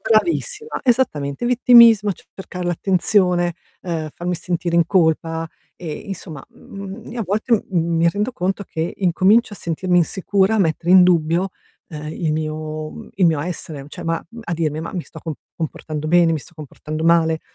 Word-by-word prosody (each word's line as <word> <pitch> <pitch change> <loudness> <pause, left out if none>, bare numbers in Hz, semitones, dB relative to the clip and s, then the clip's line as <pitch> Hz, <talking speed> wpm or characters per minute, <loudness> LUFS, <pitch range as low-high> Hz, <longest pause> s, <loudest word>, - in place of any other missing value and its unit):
bravissima, 420 - 0
esattamente. 155 - 0
Vittimismo, 235 -4 +6
c - - -17
cercare 180 -2 -7
l'attenzione, 180 -1 +2 0.3
ehm, 160 -3 -3
farmi 175 +1 -3
sentire 170 0 -2
in 170 -1 +4
colpa, 165 -2 +1 0.3
e 165 -4 -6
insomma, 165 -4 -8
mhmm, 195 +3 -10
io 240 - -5
a - - -2
volte, 215 +5 -1 0.2
mhmm, 170 -2 0
mi 170 +1 +4
rendo 210 +7 -1
conto 190 +1 -2
che 160 0 -3
incomincio 200 +5 +3
a - - -12
sentirmi 175 +2 0
insicura, 190 +4 +1
a - - +2
mettere 170 -1 0
in 185 -1 +9
dubbio, 175 +1 +2 0.4
ehm, 150 -2 -7
il 160 -3 -1
mio 155 0 -4
mhmm, - - -10
il 185 -3 +3
mio 155 -3 +2
essere, 155 -4 -6
cioè - - -9
ma 165 0 -2
uhm, 230 0 -10
a 170 - -4
dirmi 155 -1 -1
:"Ma 165 - -6
mi 180 -3 -3
sto - - -12
co 160 -3 -5 0.2
comportando 155 -1 -4
bene? 175 -1 +5
Mi 160 - 0
sto 170 - -16
comportando 155 +1 -7
male? 160 -1 +3
175 Hz, 180 wpm, -20 LUFS, 160-195 Hz, 0.4 s, in